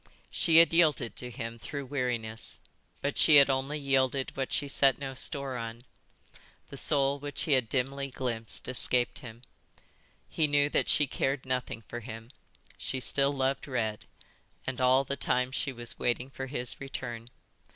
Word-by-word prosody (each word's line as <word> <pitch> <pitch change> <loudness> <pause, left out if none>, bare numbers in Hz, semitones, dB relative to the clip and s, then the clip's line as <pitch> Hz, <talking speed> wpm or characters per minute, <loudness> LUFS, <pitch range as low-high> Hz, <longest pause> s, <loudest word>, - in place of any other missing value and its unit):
She 165 -2 +3
had 165 0 +7
yielded 155 -8 +3
to 125 - -4
him, 115 -1 -6
through 140 +3 -6
weariness, 120 -5 -3 0.4
but 140 0 -1
she 155 - +7
had 140 -1 +7
only 135 +3 -2
yielded 135 -1 0
what 135 -1 -3
she 145 - 0
set 135 -2 +3
no 135 -1 -5
store 135 0 +2
on. 115 0 -6 0.9
The - - -8
soul 140 -1 +1
which 145 0 -3
he 155 - -2
had 130 -5 +3
dimly 135 +1 -1
glimpsed 120 -4 -3
escaped 125 -1 +2
him. 120 -3 -11 0.8
He 155 - 0
knew 145 0 +3
that - - +1
she 145 - +4
cared 135 0 -2
nothing 125 -3 -3
for 120 - -6
him. 115 0 -9 0.5
She 130 - -3
still 140 +2 +4
loved 135 0 -1
Red, 110 -5 -2 0.6
and 130 -1 -4
all 130 +1 +4
the 140 +1 -4
time 125 -1 0
she 135 +1 -2
was 120 -2 -3
waiting 125 +2 -1
for 135 0 -6
his 125 -2 -3
return. 120 -4 -6
130 Hz, 165 wpm, -29 LUFS, 120-140 Hz, 0.9 s, had